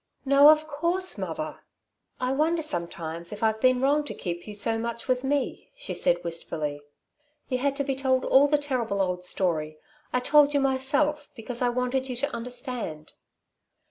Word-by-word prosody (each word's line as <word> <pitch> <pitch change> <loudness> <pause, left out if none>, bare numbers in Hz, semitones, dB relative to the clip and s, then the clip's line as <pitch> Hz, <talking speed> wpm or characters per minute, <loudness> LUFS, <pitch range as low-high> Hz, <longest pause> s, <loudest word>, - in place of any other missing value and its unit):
"No, 280 +2 +7
of 310 0 +4
course, 340 +5 +1
mother." - - -4 0.6
"I 255 0 0
wonder 320 +4 +1
sometimes 170 - -3
if 210 +1 -6
I've 220 0 +1
been 255 -1 +4
wrong 290 +3 +3
to - - -6
keep 175 0 -5
you 210 - -7
so 225 +2 0
much 235 0 -5
with 255 0 +1
me," 280 0 -2
she - - -5
said 175 0 +1
wistfully. 155 -3 -4 0.7
"You 255 -2 0
had 275 +1 0
to 280 - 0
be 270 -1 -2
told 260 -1 +1
all 275 +2 +5
the 295 +1 +3
terrible 250 -8 -2
old 180 -2 -1
story. 160 -4 0 0.3
I 250 - +1
told 290 +3 +4
you - - +4
myself, 280 +2 +1
because 235 +1 -5
I 245 - +3
wanted 250 +2 -1
you 250 - -3
to 285 +4 -2
understand." 235 - -6
255 Hz, 175 wpm, -26 LUFS, 205-285 Hz, 0.7 s, No